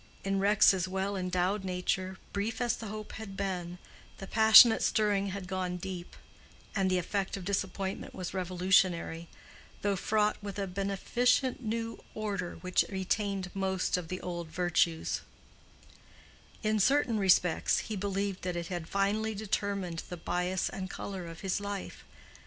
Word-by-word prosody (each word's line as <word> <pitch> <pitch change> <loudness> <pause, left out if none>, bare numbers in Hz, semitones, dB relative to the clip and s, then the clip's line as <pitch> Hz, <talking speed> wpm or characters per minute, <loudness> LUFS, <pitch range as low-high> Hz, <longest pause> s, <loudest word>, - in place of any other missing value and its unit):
In 195 0 0
Rex's 195 -2 +4
well 190 +2 -2
endowed 185 +2 0
nature, 185 0 -2 0.2
brief 205 +3 -2
as 245 -1 +1
the 225 - -7
hope 215 +1 -6
had 205 -3 -8
been, 180 -3 -3 0.4
the 195 - -7
passionate 220 +2 +8
stirring 205 -2 +2
had 195 -1 -5
gone 185 -1 -2
deep, 180 -1 -7 0.6
and 195 -2 +2
the 185 - +2
effect 195 +3 -2
of 185 - -8
disappointment 195 0 -3
was 180 -1 -5
revolutionary, 180 -2 +1 0.6
though 205 -1 +2
fraught 210 +2 +1
with 200 -1 -6
a 200 - -1
beneficent 220 +8 +1
new 230 0 -3
order 200 -5 -3
which 180 0 +2
retained 195 -1 -1
most 190 -1 0
of 180 -2 -3
the 185 +2 -4
old 175 -2 -4
virtues; 170 0 0 1.4
in 215 0 +2
certain 250 0 +3
respects 180 -3 +3
he 220 - -3
believed 200 0 -2
that 180 -1 -3
it 170 -1 -4
had 175 -3 -4
finally 210 +2 0
determined 200 -4 -2
the 180 - -5
bias 180 +2 -1
and 190 -1 -5
color 190 -4 -6
of 165 -1 -9
his 190 -1 -1
life. 200 -1 -5
195 Hz, 145 wpm, -31 LUFS, 180-205 Hz, 1.4 s, passionate